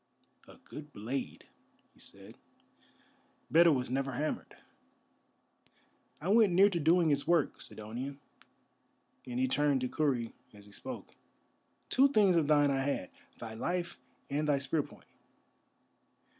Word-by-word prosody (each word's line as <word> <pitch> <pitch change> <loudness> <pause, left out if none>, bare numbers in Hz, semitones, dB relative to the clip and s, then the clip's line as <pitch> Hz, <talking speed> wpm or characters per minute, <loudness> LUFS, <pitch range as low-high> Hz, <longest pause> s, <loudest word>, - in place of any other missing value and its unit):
"A - - -15
good 150 0 -11
blade," 125 +5 -5 0.5
he - - -25
said; - - -11 1.1
"better 170 +2 +7
was 125 -3 -1
never 135 0 -1
hammered. 150 +5 -4 1.7
It 190 +4 +2
went 215 -5 +5
near 195 +3 +6
to 175 - -1
doing 165 +1 +4
its 140 -1 0
work, 170 -4 +1
Sidonian," 125 +6 -6 1.1
and 125 0 -3
he 130 - +2
turned 140 0 +2
to 125 - 0
Kurri 125 -5 -1 0.2
as 100 0 -14
he 105 - -16
spoke. - - -8 0.8
"Two 270 +2 +6
things 210 -9 +4
of 160 -4 +2
thine 145 -2 +4
I 135 -1 0
had: 135 -9 -2 0.3
thy 115 -1 -7
life 170 +8 -3 0.3
and 150 +2 -1
thy 145 - +4
spear 140 +3 0
point. - - -14
145 Hz, 135 wpm, -32 LUFS, 130-170 Hz, 1.7 s, better